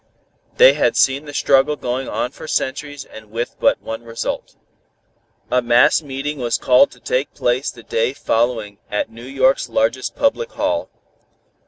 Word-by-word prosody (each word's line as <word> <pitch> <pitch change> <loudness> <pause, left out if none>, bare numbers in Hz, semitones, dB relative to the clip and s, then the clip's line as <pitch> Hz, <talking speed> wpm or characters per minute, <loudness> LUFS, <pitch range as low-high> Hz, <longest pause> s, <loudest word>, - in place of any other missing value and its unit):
They - - +8
had - - +1
seen 135 +2 +2
the 145 - -9
struggle 140 +2 +3
going 130 -1 -3
on 125 - -2
for 155 - -11
centuries 145 0 -3
and 110 -1 -13
with 115 +2 -4
but - - +3
one 115 +1 -5
result. 115 -1 -5 1.0
A 125 - +3
mass 120 +5 +4
meeting 145 0 -5
was 120 -2 0
called 125 +2 +4
to - - -18
take 130 +3 -2
place 125 +3 0
the 115 - -11
day 115 +4 0
following 115 -5 -1
at 105 +2 -2
New 115 +2 -11
York's 130 -1 +2
largest 115 +3 0
public 470 - 0
hall. - - -1
130 Hz, 160 wpm, -19 LUFS, 115-140 Hz, 1.0 s, They